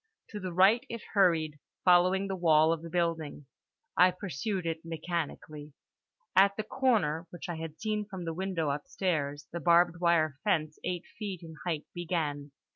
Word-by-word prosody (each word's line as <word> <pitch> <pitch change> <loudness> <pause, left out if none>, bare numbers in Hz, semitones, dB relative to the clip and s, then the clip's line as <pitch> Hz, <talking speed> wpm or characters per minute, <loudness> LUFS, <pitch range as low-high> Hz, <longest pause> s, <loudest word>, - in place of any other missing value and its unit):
To 210 - -6
the 185 -2 -4
right 190 +7 +5
it 230 -1 -6
hurried, 165 -7 +3 0.3
following 185 +2 +5
the 195 - -2
wall 160 -2 +4
of 165 - -4
the 165 - -8
building. 165 -4 -2 0.5
I 180 - +7
pursued 180 +1 -3
it 165 -1 -3
mechanically. 155 -3 -5 0.6
At 200 +1 +5
the 215 - -1
corner, 210 - +1
which 175 +2 -8
I 175 -2 -4
had 160 -1 -7
seen 215 0 -1
from 190 -4 -7
the 165 - -2
window 175 -4 -1
upstairs, 145 -1 -2
the 170 - -4
barbed 170 +1 +4
wire 160 -5 +2
fence 155 -7 0
eight 175 -1 -3
feet 195 -5 -5
in 160 -1 -9
height 160 -4 -2
began. 160 -5 -2
170 Hz, 165 wpm, -30 LUFS, 155-190 Hz, 0.6 s, I